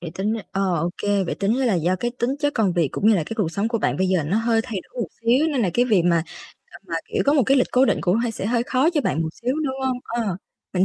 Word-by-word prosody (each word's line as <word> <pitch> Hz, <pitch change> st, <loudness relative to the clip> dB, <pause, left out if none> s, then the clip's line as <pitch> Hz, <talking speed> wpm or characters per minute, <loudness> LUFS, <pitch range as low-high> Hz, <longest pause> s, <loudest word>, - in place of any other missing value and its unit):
Vậy 170 Hz, -2 st, -6 dB
tính 210 Hz, +3 st, -1 dB
r 225 Hz, -, -3 dB
ờ, 195 Hz, -2 st, 0 dB
ô 170 Hz, +2 st, -1 dB
kê, 205 Hz, -2 st, +1 dB
vậy -, -, -3 dB
tính 205 Hz, +5 st, 0 dB
ra 265 Hz, -, +1 dB
là 225 Hz, -6 st, +2 dB
do 175 Hz, +2 st, +1 dB
cái 240 Hz, +6 st, -2 dB
tính 240 Hz, +2 st, 0 dB
chất 290 Hz, -1 st, 0 dB
công 205 Hz, -6 st, +2 dB
việc 170 Hz, -5 st, +1 dB
cũng 215 Hz, -, +2 dB
như 220 Hz, -, +6 dB
là 170 Hz, -, +1 dB
cái -, -, -7 dB
cuộc 200 Hz, -8 st, 0 dB
sống 205 Hz, +4 st, -1 dB
của 230 Hz, -1 st, -1 dB
bạn -, -, 0 dB
bây 190 Hz, +1 st, +1 dB
giờ 185 Hz, -4 st, +2 dB
nó 185 Hz, -, 0 dB
hơi 225 Hz, 0 st, +2 dB
thay 215 Hz, -7 st, -4 dB
đổi 250 Hz, -, -9 dB
một 190 Hz, -, -4 dB
xíu 250 Hz, +7 st, +3 dB
nên 275 Hz, -7 st, 0 dB
là 185 Hz, -, +1 dB
cái 245 Hz, -, +3 dB
việc 205 Hz, -8 st, +3 dB
mà, 170 Hz, -2 st, +3 dB, 0.4 s
à, -, -, -14 dB
mà, -, -, -3 dB, 0.2 s
kiểu, -, -, +1 dB
có 285 Hz, -, +5 dB
một 285 Hz, -3 st, +4 dB
cái 275 Hz, -, +4 dB
lịch 255 Hz, -, +3 dB
cố 255 Hz, +2 st, +5 dB
định -, -, +1 dB
cũng 180 Hz, +3 st, +2 dB
hơi 235 Hz, 0 st, 0 dB
sẽ 200 Hz, -, -4 dB
hơi 235 Hz, +1 st, +1 dB
khó 260 Hz, +6 st, +2 dB
cho 325 Hz, -4 st, +1 dB
bạn 165 Hz, -, 0 dB
một 160 Hz, -, -2 dB
xíu, 250 Hz, +2 st, 0 dB
đúng 265 Hz, -2 st, -2 dB
hông? 255 Hz, -1 st, -1 dB
Ờ, 225 Hz, -6 st, -2 dB, 0.4 s
mình 185 Hz, +1 st, +3 dB
220 Hz, 325 wpm, -22 LUFS, 185-250 Hz, 0.4 s, như